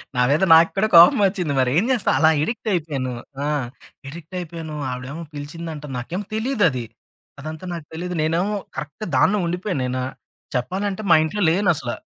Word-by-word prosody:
నా 125 Hz, -, +2 dB
మీద 155 Hz, +6 st, +2 dB
నాకు 165 Hz, +1 st, +7 dB
కూడా 215 Hz, +2 st, +2 dB
కోపం 170 Hz, +4 st, +8 dB
వచ్చింది 185 Hz, -6 st, -1 dB
మరేం 130 Hz, -, +2 dB
చేస్తాం. 235 Hz, -6 st, +1 dB
అలా 160 Hz, 0 st, +6 dB
అడిక్టయిపోయాను. 160 Hz, -, -2 dB, 0.3 s
ఆ! -, -, 0 dB, 0.6 s
అడిక్టయిపోయాను, 165 Hz, -1 st, -7 dB, 0.2 s
ఆవిడెమో 130 Hz, +6 st, -6 dB
పిలిచిందంట, 150 Hz, +1 st, -7 dB
నాకేమో 175 Hz, +11 st, -4 dB
తెలిదది. 205 Hz, -, +1 dB, 0.6 s
అదంతా 155 Hz, +3 st, -7 dB
నాకు 165 Hz, -3 st, -7 dB
తెలీదు. 180 Hz, +2 st, -4 dB
నేనేమో 175 Hz, +7 st, 0 dB, 0.2 s
కరెక్ట్‌ 150 Hz, +10 st, -6 dB
దానిలో 205 Hz, +10 st, +4 dB
ఉండిపోయాను 180 Hz, -4 st, -2 dB
నేనా 125 Hz, 0 st, -2 dB, 0.5 s
చెప్పాలంటే 190 Hz, -, -2 dB
మా -, -, +9 dB
ఇంట్లో 205 Hz, +6 st, -3 dB
లేను 185 Hz, +2 st, +2 dB
అసల. 120 Hz, -4 st, -4 dB
165 Hz, 145 wpm, -22 LUFS, 145-190 Hz, 0.6 s, మా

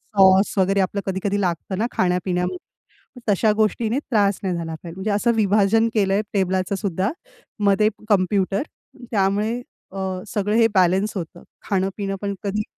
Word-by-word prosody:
Sauce 195 Hz, +1 st, +5 dB
वगैरे 195 Hz, +1 st, +2 dB
आपलं 195 Hz, +2 st, -1 dB
कधी-कधी 195 Hz, +1 st, -1 dB
लागतं 180 Hz, +1 st, -2 dB
ना 220 Hz, -, +1 dB
खाण्यापिण्यामध्ये, 180 Hz, 0 st, 0 dB, 0.7 s
तशा 210 Hz, +2 st, +3 dB
गोष्टीने 220 Hz, +3 st, 0 dB
त्रास 205 Hz, -8 st, +1 dB
नाही 185 Hz, -2 st, -1 dB
झाला 165 Hz, -1 st, -4 dB
पाहिजे. 165 Hz, +1 st, -10 dB
म्हणजे 190 Hz, +3 st, -2 dB
असं 210 Hz, +4 st, +2 dB
विभाजन 215 Hz, +1 st, +3 dB
केलं 195 Hz, -3 st, +2 dB
आहे 205 Hz, -, +2 dB
टेबलाचं 190 Hz, -1 st, 0 dB
सुद्धा 195 Hz, +2 st, -1 dB, 0.5 s
मध्ये 200 Hz, +2 st, +4 dB, 0.2 s
कॉम्प्युटर 195 Hz, +1 st, +2 dB, 0.5 s
त्यामुळे 210 Hz, +4 st, +1 dB, 0.3 s
अ, 195 Hz, -, -9 dB, 0.3 s
सगळं 205 Hz, +1 st, -1 dB
हे 230 Hz, 0 st, +5 dB
बॅलन्स 190 Hz, +3 st, +2 dB
होतं. 175 Hz, -1 st, -7 dB, 0.3 s
खाणं 195 Hz, -1 st, +1 dB
पिणं 195 Hz, -1 st, -2 dB
पण 200 Hz, -1 st, -2 dB
कधी 205 Hz, +1 st, -1 dB
195 Hz, 150 wpm, -22 LUFS, 185-210 Hz, 0.7 s, Sauce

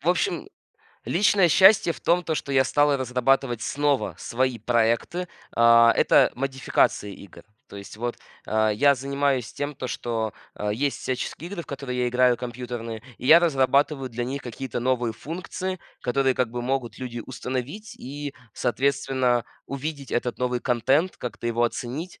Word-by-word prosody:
В -, -, -2 dB
общем, -, -, 0 dB, 0.6 s
личное 195 Hz, 0 st, +3 dB
счастье 190 Hz, 0 st, +6 dB
в -, -, -13 dB
том, 175 Hz, +1 st, +2 dB
то, 160 Hz, -1 st, -2 dB
что 140 Hz, -, -4 dB
я 130 Hz, -1 st, +4 dB
стал 145 Hz, -1 st, +3 dB
разрабатывать 125 Hz, -1 st, +1 dB
снова 145 Hz, -1 st, 0 dB
свои 130 Hz, 0 st, -1 dB
проекты. 120 Hz, +10 st, 0 dB, 0.3 s
А, 115 Hz, 0 st, +6 dB
это -, -, +5 dB
модификация 130 Hz, -5 st, 0 dB
игр. 100 Hz, -1 st, -12 dB, 0.3 s
То -, -, -11 dB
есть 100 Hz, +1 st, -10 dB
вот, 120 Hz, +1 st, -3 dB, 0.3 s
э, 110 Hz, 0 st, +2 dB
я 140 Hz, +6 st, +5 dB
занимаюсь 140 Hz, -1 st, -1 dB
тем, 145 Hz, +1 st, -4 dB
то, 130 Hz, -, -5 dB
что, 115 Hz, -3 st, -2 dB, 0.3 s
э, 105 Hz, -, -1 dB
есть 135 Hz, +6 st, -1 dB
всяческие 140 Hz, +6 st, -4 dB
игры, 200 Hz, -3 st, -5 dB
в -, -, -19 dB
которые 135 Hz, -3 st, -4 dB
я 125 Hz, -, +1 dB
играю 125 Hz, 0 st, +3 dB
компьютерные, 120 Hz, -2 st, -6 dB, 0.2 s
и 125 Hz, -, -6 dB
я 165 Hz, +5 st, +9 dB
разрабатываю 140 Hz, -3 st, +2 dB
для 120 Hz, 0 st, -4 dB
них 135 Hz, +3 st, -4 dB
какие-то 125 Hz, 0 st, -5 dB
новые 120 Hz, -2 st, 0 dB
функции, 180 Hz, -, -5 dB, 0.2 s
которые 130 Hz, +1 st, +1 dB
как 125 Hz, -3 st, 0 dB
бы 120 Hz, 0 st, -4 dB
могут 125 Hz, -3 st, -2 dB
люди 120 Hz, -2 st, -5 dB
установить 130 Hz, -, -5 dB
и 145 Hz, +2 st, -6 dB, 0.2 s
соответственно 130 Hz, -1 st, +1 dB, 0.2 s
увидеть 140 Hz, 0 st, -5 dB
этот 120 Hz, -1 st, -1 dB
новый 125 Hz, -1 st, -1 dB
контент, 135 Hz, +9 st, +1 dB
как-то 120 Hz, -1 st, -6 dB
его 120 Hz, 0 st, 0 dB
оценить, 130 Hz, +8 st, -3 dB
130 Hz, 160 wpm, -25 LUFS, 120-140 Hz, 0.6 s, я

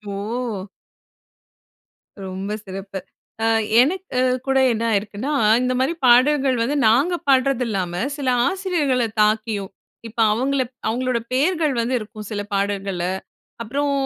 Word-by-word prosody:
ஓ! 215 Hz, -1 st, -4 dB, 1.6 s
ரொம்ப 190 Hz, +2 st, -5 dB
சிறப்பு. 195 Hz, 0 st, -6 dB, 0.4 s
அ -, -, +2 dB, 0.4 s
எனக்கு 355 Hz, +8 st, +1 dB
கு 250 Hz, -, +1 dB, 0.3 s
கூட 270 Hz, 0 st, +2 dB
என்ன 225 Hz, 0 st, -1 dB
ஆயிருக்குன்னா? 210 Hz, +6 st, -2 dB, 0.3 s
இந்த 255 Hz, 0 st, 0 dB
மாதிரி 265 Hz, +6 st, +1 dB
பாடல்கள் 260 Hz, +2 st, +4 dB
வந்து 275 Hz, +5 st, -1 dB
நாங்க 270 Hz, +11 st, +3 dB
பாடுறதில்லாம, 250 Hz, -9 st, +1 dB, 0.2 s
சில 280 Hz, -3 st, -4 dB, 0.2 s
ஆசிரியர்கள 350 Hz, -9 st, 0 dB, 0.2 s
தாக்கியும், 215 Hz, -2 st, 0 dB, 0.4 s
இப்ப 230 Hz, +1 st, -10 dB
அவங்கள 265 Hz, +4 st, 0 dB
ப் -, -, -45 dB
அவங்களோட 245 Hz, +2 st, 0 dB
பேர்கள் 310 Hz, +2 st, +1 dB
வந்து 235 Hz, +2 st, -1 dB
இருக்கும் 215 Hz, -1 st, -9 dB
சில 205 Hz, -1 st, -2 dB
பாடல்கள்ல. 195 Hz, -2 st, -1 dB, 0.6 s
அப்புறம் 280 Hz, +5 st, -1 dB
240 Hz, 120 wpm, -21 LUFS, 205-275 Hz, 1.6 s, பாடல்கள்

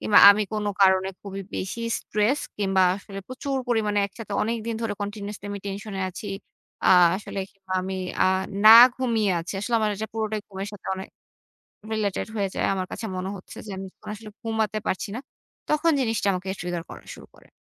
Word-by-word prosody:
কিংবা 210 Hz, -, +5 dB
আমি 205 Hz, +1 st, +3 dB
কোন 210 Hz, -1 st, -1 dB, 0.2 s
কারণে 190 Hz, 0 st, +5 dB
খুবই 195 Hz, -1 st, -6 dB
বেশি 190 Hz, +5 st, -4 dB, 0.2 s
স্ট্রেস 215 Hz, +7 st, +1 dB, 0.2 s
কিংবা 195 Hz, -2 st, +2 dB
আসলে 195 Hz, 0 st, -9 dB
প্রচুর 270 Hz, +2 st, -3 dB
পরিমাণে 215 Hz, -3 st, +1 dB
একসাথে 205 Hz, +1 st, -9 dB
অনেকদিন 230 Hz, 0 st, -2 dB
ধরে 220 Hz, -2 st, -1 dB
কন্টিনিউয়াসলি 205 Hz, 0 st, -5 dB
আমি 200 Hz, -, -4 dB
টেনশন 200 Hz, +1 st, -5 dB
এ -, -, -2 dB
আছি। 185 Hz, +3 st, -8 dB, 0.6 s
আ -, -, +5 dB, 0.3 s
আসলে 200 Hz, 0 st, -7 dB
কিংবা 190 Hz, -2 st, -10 dB
আমি 190 Hz, +1 st, -4 dB, 0.3 s
আ -, -, +5 dB, 0.4 s
না 215 Hz, -, +11 dB, 0.3 s
ঘুমিয়ে 230 Hz, -5 st, +1 dB
আছি। 165 Hz, -, -6 dB
আসলে 235 Hz, +4 st, -2 dB
আমার 215 Hz, -1 st, +2 dB
এটা 220 Hz, +2 st, -3 dB
পুরোটাই, 215 Hz, -1 st, -1 dB
ঘুমের 195 Hz, 0 st, -5 dB
সাথে 205 Hz, -, -11 dB
অনেক 190 Hz, 0 st, -7 dB, 0.8 s
রিলেটেড 210 Hz, -3 st, -1 dB
হয়ে 200 Hz, -2 st, 0 dB
যায়। -, -, 0 dB
আমার 185 Hz, -1 st, -2 dB
কাছে 230 Hz, -, -5 dB
মনে 185 Hz, +1 st, -3 dB
হচ্ছে 185 Hz, -, -12 dB
যে, -, -, -9 dB
আমি 190 Hz, 0 st, -6 dB, 0.3 s
আসলে 215 Hz, 0 st, -10 dB
ঘুমাতে 220 Hz, -1 st, -1 dB
পারছি 190 Hz, +3 st, -2 dB
না। -, -, -3 dB, 0.5 s
তখন 305 Hz, +2 st, +3 dB
জিনিসটা 225 Hz, -5 st, 0 dB
আমাকে 185 Hz, +1 st, -4 dB
ট্রিগার 175 Hz, -1 st, -3 dB
করা -, -, -10 dB
শুরু -, -, -14 dB
করে। -, -, -20 dB
205 Hz, 185 wpm, -25 LUFS, 195-220 Hz, 0.8 s, না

